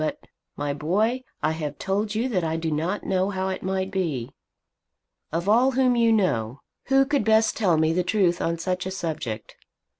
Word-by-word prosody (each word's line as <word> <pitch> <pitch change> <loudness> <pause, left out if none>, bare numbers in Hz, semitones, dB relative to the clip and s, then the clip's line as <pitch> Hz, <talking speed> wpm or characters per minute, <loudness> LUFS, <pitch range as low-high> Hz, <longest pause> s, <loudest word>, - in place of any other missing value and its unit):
But, 155 - -2 0.4
my 145 0 -1
boy, 210 - 0 0.2
I 155 - +2
have 150 -3 -4
told 205 +2 -1
you 230 +4 +1
that 185 -7 0
I 160 0 -1
do 165 -1 -2
not 165 +7 -1
know 190 +1 0
how 190 -1 -2
it 190 - -4
might 190 0 -2
be. 155 -11 -2 1.0
Of 170 +4 -2
all 245 +5 +4
whom 255 -1 +3
you 230 -1 +4
know, 140 - 0 0.2
who 270 0 +4
could 285 0 +1
best 220 0 +3
tell 185 -7 +2
me 160 +1 +2
the 180 - +2
truth 180 -2 +1
on 170 0 0
such 180 +2 -2
a - - -4
subject? 150 - -5
185 Hz, 190 wpm, -25 LUFS, 160-215 Hz, 1.0 s, all